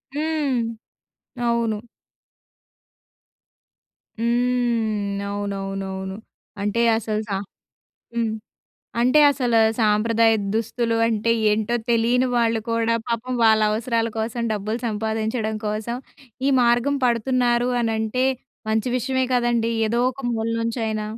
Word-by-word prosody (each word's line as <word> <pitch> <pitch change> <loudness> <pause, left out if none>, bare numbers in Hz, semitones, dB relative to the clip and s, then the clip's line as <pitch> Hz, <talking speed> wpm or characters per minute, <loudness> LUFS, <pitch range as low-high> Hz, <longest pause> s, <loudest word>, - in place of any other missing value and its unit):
హ్మ్. 300 -4 0 0.9
అవును. 230 -3 0 2.4
హ్మ్. 230 -4 0
అవునవునవును. 195 -1 -4 0.5
అంటే, 210 +3 0 0.2
అసలు 215 -1 -2
సా 200 - 0 0.8
హ్మ్. 230 -2 0 0.7
అంటే, 255 +5 +5
అసలు 245 -4 +1 0.2
సాంప్రదాయ 225 +1 +3 0.2
దుస్తులు 230 +1 0
అంటే, 225 0 0 0.2
ఏంటో 215 +2 0 0.2
తెలియని 240 +2 +3
వాళ్ళు 230 -1 +2
కూడా 230 0 +1
పాపం 240 +2 -2
వాళ్ళ 220 -1 +5
అవసరాల 230 +1 0
కోసం 230 +2 -2
డబ్బులు 215 +2 -2
సంపాదించడం 220 0 -2
కోసం, 215 +3 -2 0.5
ఈ - - +4
మార్గం 240 +4 +3
పడుతున్నారు 240 0 +2
అనంటే 225 +2 0 0.5
మంచి 220 +2 +1
విషయమే 260 +1 0
కదండీ! 240 -2 +1 0.2
ఏదో 235 +2 0
ఒక 260 - -10
మూల 225 0 -1
నుంచి 230 +1 -2
అయినా. 215 -1 -2
230 Hz, 100 wpm, -23 LUFS, 215-240 Hz, 2.4 s, అంటే